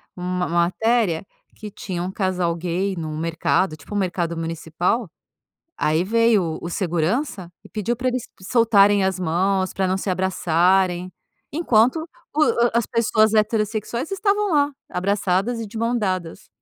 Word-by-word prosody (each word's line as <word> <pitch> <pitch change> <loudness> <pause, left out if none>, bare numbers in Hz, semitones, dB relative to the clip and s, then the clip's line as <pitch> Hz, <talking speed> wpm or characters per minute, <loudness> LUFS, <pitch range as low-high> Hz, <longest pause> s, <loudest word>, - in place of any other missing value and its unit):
uma 180 0 -2
matéria 180 +2 +1 0.3
que 215 -1 -8
tinha 180 -3 -5
um 185 - -3
casal 185 -3 0
gay 180 +3 -2
num 155 -2 -4
mercado 165 +1 0
tipo 155 +7 -12
um - - 0
mercado 175 -3 -1
municipal 165 +6 -2 0.7
aí 155 +3 +1
veio 230 -1 +3
o 160 -2 -3
o - - -5
segurança 180 - -1
e - - -13
pediu 220 +3 -2
pra 255 +1 -1
eles 250 -1 -2 0.2
soltarem 205 -2 +4
as 190 -1 0
mãos 185 +3 0
pra 190 - 0
não 185 +1 +1
se 195 - -4
abraçarem 185 0 +1 0.4
enquanto 255 -4 +3 0.4
o 305 - +4 0.3
as 235 -1 +2
pessoas 220 -1 +2
heterossexuais 215 - 0
estavam 405 -1 +1
lá, 290 -1 +3 0.2
abraçadas 200 +4 0
e 225 - -4
de 215 - -11
mãos 235 +2 0
dadas. 185 -5 -3
190 Hz, 150 wpm, -22 LUFS, 175-225 Hz, 0.7 s, soltarem